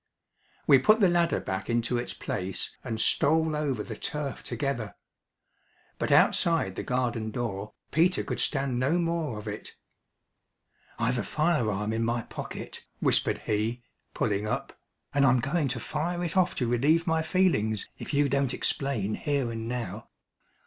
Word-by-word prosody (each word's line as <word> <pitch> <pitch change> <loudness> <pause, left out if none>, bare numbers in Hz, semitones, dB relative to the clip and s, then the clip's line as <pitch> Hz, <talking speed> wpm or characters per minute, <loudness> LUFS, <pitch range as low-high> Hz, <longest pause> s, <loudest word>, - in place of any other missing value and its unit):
We 135 - +7
put 215 - +5
the 190 -5 +5
ladder 170 -1 +2
back 95 +2 -4
into 120 +1 +1
its 120 - -4
place 95 +1 -4
and 115 -4 -3
stole 160 +5 +3
over 140 -8 -1
the 110 - -6
turf 145 +4 -4
together. 120 -3 -3 1.0
But - - -1
outside 165 - +4
the - - -3
garden 120 -3 -1
door 105 -3 -4 0.2
Peter 175 +4 +3
could - - -4
stand 135 -4 0
no 140 +7 +2
more 165 -8 -1
of 105 - -8
it - - -6 1.2
"I've 120 +2 +1
a - - -1
fire 150 - +1
arm 105 +2 -1
in 115 +1 0
my 115 0 0
pocket," - - -7 0.2
whispered - - +1
he, 110 +3 -1 0.3
pulling 105 -1 0
up, - - -3 0.4
"and 140 0 +3
I'm 130 -2 +5
going 140 +4 0
to 130 -1 -2
fire 175 +8 -2
it 170 0 -3
off 185 -2 +3
to 125 - 0
relieve 145 +8 +3
my 160 -2 +2
feelings 160 - +1
if - - -6
you 145 -1 +3
don't 140 -1 +1
explain 115 -7 -1
here 140 -4 -1
and 115 0 -4
now. 115 -4 -4
125 Hz, 160 wpm, -28 LUFS, 110-155 Hz, 1.2 s, We